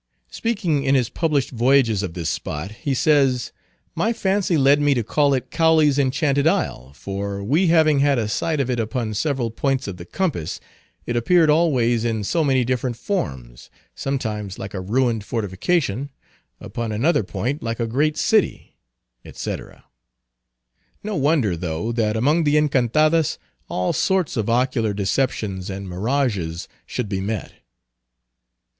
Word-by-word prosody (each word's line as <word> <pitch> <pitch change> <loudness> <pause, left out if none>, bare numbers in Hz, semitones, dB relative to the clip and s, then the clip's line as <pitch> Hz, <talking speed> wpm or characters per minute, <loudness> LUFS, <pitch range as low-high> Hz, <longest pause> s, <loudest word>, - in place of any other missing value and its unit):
Speaking 185 -11 -1
in 135 0 +3
his 125 -4 +2
published 150 -5 0
voyages 120 -3 +3
of 95 -4 -5
this 85 -3 -3
spot, 85 +7 -4
he 135 +5 -3
says—"My 140 - 0
fancy 190 -5 +1
led 140 +1 +4
me 145 -1 +3
to 120 - 0
call 140 +5 +2
it 125 -1 -4
Cowley's 155 -3 +3
Enchanted 140 +2 +1
Isle, 65 - -1
for, 100 +4 -5
we 155 - +2
having 155 -3 +4
had 140 -1 +3
a 110 -3 0
sight 155 +8 -1
of 135 - 0
it 125 -2 -1
upon 110 0 -2
several 130 -1 -1
points 135 +1 -1
of 95 -3 -5
the 85 - -9
compass, 140 - -2 0.5
it 120 - -2
appeared 160 +6 +4
always 125 -8 +2
in 110 -3 -1
so 160 +11 +1
many 130 -4 +2
different 125 -1 -1
forms; 65 - -4 0.2
sometimes 110 -8 -3
like 95 - -7
a 95 - -4
ruined 115 +2 0
fortification; 115 - -1 0.5
upon 115 -2 -5
another 125 +11 +2
point 125 +8 -3
like 115 0 -3
a 115 - 0
great 150 +7 0
city," 215 -3 0 0.4
etc. - - -7 1.2
No 210 0 -3
wonder 140 - +2
though, 85 +5 -3
that 110 -2 0
among 150 +8 +2
the 150 0 +3
Encantadas 150 +2 +2 0.3
all 90 0 -1
sorts 190 -4 +1
of 110 -2 -1
ocular 120 -3 +1
deceptions 100 -2 -1
and 100 0 -6
mirages 95 -4 -1 0.2
should 125 - -3
be 95 -2 -2
met. 105 0 -4
125 Hz, 150 wpm, -22 LUFS, 105-150 Hz, 1.2 s, led